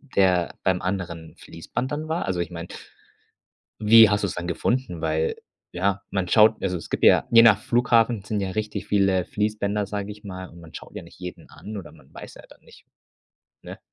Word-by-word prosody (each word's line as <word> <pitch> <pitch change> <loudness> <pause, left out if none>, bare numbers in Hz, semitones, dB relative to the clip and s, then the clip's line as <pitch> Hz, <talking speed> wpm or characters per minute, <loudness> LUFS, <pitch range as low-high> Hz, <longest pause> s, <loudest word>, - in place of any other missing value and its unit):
der 95 - +1
beim 95 -2 +1
anderen 90 -3 -4
Fließband 125 +10 -6
dann 155 +2 -4
war? 160 +2 -2
Also, 90 -1 -2
ich 85 - -3
meine 85 0 -7 1.1
wie 110 +1 +8
hast 105 0 0
du's 100 - -2
dann 90 0 -5
gefunden? 90 0 -2
Weil 80 0 -1 0.3
ja, 100 +2 -1
man 95 -2 -2
schaut 110 +1 +4
also 90 -2 -1
es 85 - -9
gibt - - -1
ja, - - +5
je 115 0 +8
nach 110 -3 +6
Flughafen 120 -2 +2
sind 105 +1 -2
ja 95 -1 -2
richtig 105 +2 -4
viele 95 -3 +2
Fließbänder, 105 0 -2
sage 100 0 -5
ich 105 +1 -11
mal 95 -2 -7
und 85 - -15
man 80 -1 -15
schaut - - -10
ja - - -6
nicht 85 - -16
jeden 90 0 -9
an 105 +1 -9
oder 95 -4 -9
man - - -20
weiß - - -11
ja - - -13
dann - - -19
nicht - - -19 0.8
ne? - - -10
100 Hz, 200 wpm, -24 LUFS, 90-110 Hz, 1.1 s, wie